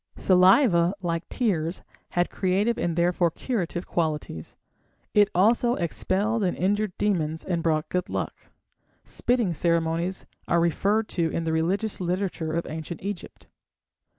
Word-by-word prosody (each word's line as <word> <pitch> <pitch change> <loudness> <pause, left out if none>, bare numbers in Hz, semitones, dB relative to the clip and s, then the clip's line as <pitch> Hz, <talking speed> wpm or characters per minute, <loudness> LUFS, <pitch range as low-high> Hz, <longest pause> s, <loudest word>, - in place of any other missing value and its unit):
_ - - -11
Saliva, 185 -1 +5
like 170 -1 -2
tears, 180 -8 -1 0.3
had 175 - +2
creative 200 +5 +1
and 170 -2 -1
therefore 175 0 +2
curative 175 -2 -3
qualities; 150 - -3 0.6
it 205 -1 +5
also 235 +6 +3
expelled 200 +5 -1
and 180 - 0
injured 205 +1 0
demons 160 -6 -1
and 175 -3 -1
brought 155 -2 0
good 180 -1 -2
luck. - - -2 0.7
Spitting 240 -7 0
ceremonies 170 +3 0 0.2
are 170 - +3
referred 200 +6 +1
to 165 -2 0
in 165 - -2
the 160 0 -1
religious 190 +7 -1
literature 180 -2 -2
of 170 +1 -1
Ancient 160 +2 -6
Egypt. 200 -3 -6
180 Hz, 135 wpm, -26 LUFS, 165-200 Hz, 0.7 s, Saliva